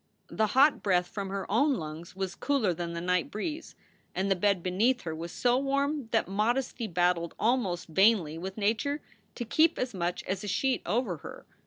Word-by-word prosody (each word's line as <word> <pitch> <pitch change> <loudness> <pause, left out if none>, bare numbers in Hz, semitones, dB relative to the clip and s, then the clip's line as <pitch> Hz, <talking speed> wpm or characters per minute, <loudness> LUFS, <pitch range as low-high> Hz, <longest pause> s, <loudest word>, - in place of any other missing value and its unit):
The 220 - +1
hot 285 +3 +6
breath 180 -3 +2
from 195 +1 -5
her 195 0 -3
own 275 +7 +3
lungs 160 0 -7
was 190 -1 -3
cooler 260 -10 +1
than 170 0 -4
the 170 - -3
night 180 0 0
breeze, 305 +9 -5 0.4
and 195 +2 0
the - - +5
bed 190 -1 +1
beneath 225 +8 +2
her 160 -3 -4
was 165 +2 -6
so 245 +1 +2
warm 280 0 0
that 225 -5 +1
modesty 230 +4 0
battled 175 -2 +1
almost 215 -7 0
vainly 185 -2 +3
with 190 +3 -6
nature 225 +8 0 0.3
to 240 - -4
keep 315 +8 +3
as 250 -2 -2
much 175 -1 -2
as 190 +1 -3
a - - -5
sheet 260 +6 +1
over 205 -2 0
her. - - -10
200 Hz, 190 wpm, -29 LUFS, 180-250 Hz, 0.4 s, hot